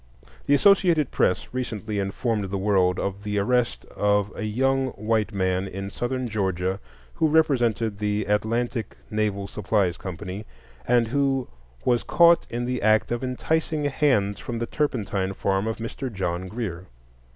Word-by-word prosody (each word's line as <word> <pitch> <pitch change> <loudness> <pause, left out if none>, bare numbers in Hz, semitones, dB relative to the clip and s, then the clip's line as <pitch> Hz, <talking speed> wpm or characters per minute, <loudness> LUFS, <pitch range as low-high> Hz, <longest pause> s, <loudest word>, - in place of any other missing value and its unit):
The 145 - +5
"Associated 175 -5 +4
Press" 90 - +1
recently 110 -4 -3
informed 105 +2 -1
the 95 +1 -3
world 95 -2 +2
of 100 0 -3
the 105 0 -2
arrest 120 +4 +1
of 105 0 +2
a 110 - -4
young 135 +5 +1
white 110 0 0
man 95 -1 0
in 95 +1 -6
Southern 125 +3 -2
Georgia 95 -3 -1 0.3
who 160 - +2
represented 120 -9 +2
the 105 0 0
"Atlantic 110 - -1
Naval 105 -2 0
Supplies 100 -3 0
Company," 95 +3 -6 0.4
and 120 -2 +3
who 135 -1 +1 0.4
"was 120 -2 +3
caught 170 0 +5
in 120 +1 -2
the 125 0 -2
act 110 +2 +3
of 120 +1 -1
enticing 155 +4 -1
hands 125 -8 +1
from 120 - -5
the 115 - -1
turpentine 105 -9 -1
farm 95 +2 0
of 110 - -2
Mr. 120 +3 -5
John 95 -2 -2
Greer." 95 -5 -5
110 Hz, 150 wpm, -25 LUFS, 100-125 Hz, 0.4 s, The